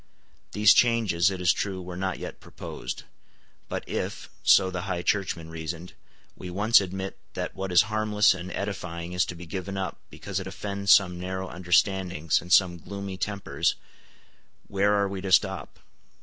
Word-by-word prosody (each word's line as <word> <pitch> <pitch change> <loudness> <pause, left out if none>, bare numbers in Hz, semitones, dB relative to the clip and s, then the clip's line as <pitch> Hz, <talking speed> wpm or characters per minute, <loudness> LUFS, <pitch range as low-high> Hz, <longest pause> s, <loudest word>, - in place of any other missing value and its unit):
These 105 0 +6
changes, 110 -8 +3
it 95 -1 -4
is 90 -1 +4
true, 95 -2 -3
were 90 -1 -7
not 95 0 -2
yet - - -7
proposed. - - -7 0.7
Put - - -4
if, - - -4
so 95 -1 +5
the 90 +1 -4
High 90 -1 -2
Churchmen 90 -5 -1
reasoned, 80 +2 -6 0.4
we 90 - -8
once 105 +5 +5
admit 95 0 -5 0.2
that - - -3
what 95 -1 -4
is 90 - +6
harmless 110 -1 +3
and 90 0 -7
edifying 90 -4 -4
is 90 0 +2
to 90 - -6
be 90 +1 -9
given 95 +2 -5
up 95 -3 -3
because 100 -1 -5
it 95 - -6
offends 100 +1 -1
some 90 -3 +5
narrow 95 +1 -4
understandings 90 -2 +1
and 90 +2 -11
some 90 -1 +5
gloomy 100 +2 -6
tempers, 100 +2 -1 0.9
where 100 +1 +2
are 100 -1 +2
we 95 -1 -5
to 95 0 -4
stop? - - +2
95 Hz, 165 wpm, -27 LUFS, 90-100 Hz, 0.9 s, These